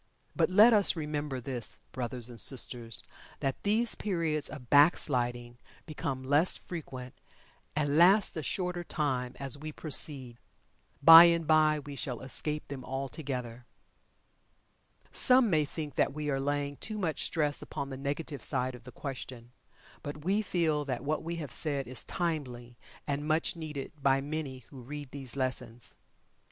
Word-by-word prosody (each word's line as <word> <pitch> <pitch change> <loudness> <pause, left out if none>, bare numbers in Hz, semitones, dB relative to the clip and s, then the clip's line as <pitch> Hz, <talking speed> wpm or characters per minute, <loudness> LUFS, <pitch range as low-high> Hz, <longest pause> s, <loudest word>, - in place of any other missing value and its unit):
But, - - +2
let 215 +5 +7
us 205 -3 +6
remember 150 -4 -3
this, 125 -2 +1
brothers 125 -1 -4
and 120 -2 -7
sisters, 120 0 -1 0.4
that 135 -1 -2
these 220 +3 +2
periods 165 -7 -2
of 130 -5 -10
"back 145 +4 +6
sliding" 120 -3 -1 0.3
become 140 -4 -4
less 145 +6 +3
frequent, 130 -7 -8 0.6
and 150 0 +1
last 195 +4 +5
a 160 - -3
shorter 180 +3 -3
time, 130 -7 -2
as 140 0 -3
we 155 +1 -6
proceed. 135 -5 +1 0.6
Bye 165 +1 +11
and 170 -1 +2
bye 155 0 +4
we 145 -1 -8
shall 130 -4 -5
escape 150 +3 -2
them 135 -2 -7
altogether. 130 -3 -5 1.4
Some 255 -4 +6
may 155 -2 +3
think 150 -1 -6
that - - +2
we 150 0 -3
are 135 - 0
laying 145 0 -2
too 215 -1 -5
much 165 -8 -2
stress 150 -3 0
upon 140 0 -6
the - - -4
negative 140 +2 -4
side 130 -2 -1
of 125 -1 -13
the 125 - -10
question, 125 -3 -8 0.5
but 145 +1 -8
we 200 +4 +2
feel 165 -7 0
that 130 -3 -4
what 155 +2 -1
we 170 +1 -4
have 150 -6 -6
said 140 -2 -1
is 125 -1 -2
timely, 130 -8 -4 0.3
and 145 +1 -3
much 160 +2 +1
needed 150 -4 -6
by 135 0 +3
many 140 -3 -5
who 135 -3 -10
read 145 +2 -8
these 135 -3 -4
lessons. 130 -3 -3
145 Hz, 155 wpm, -30 LUFS, 130-160 Hz, 1.4 s, Bye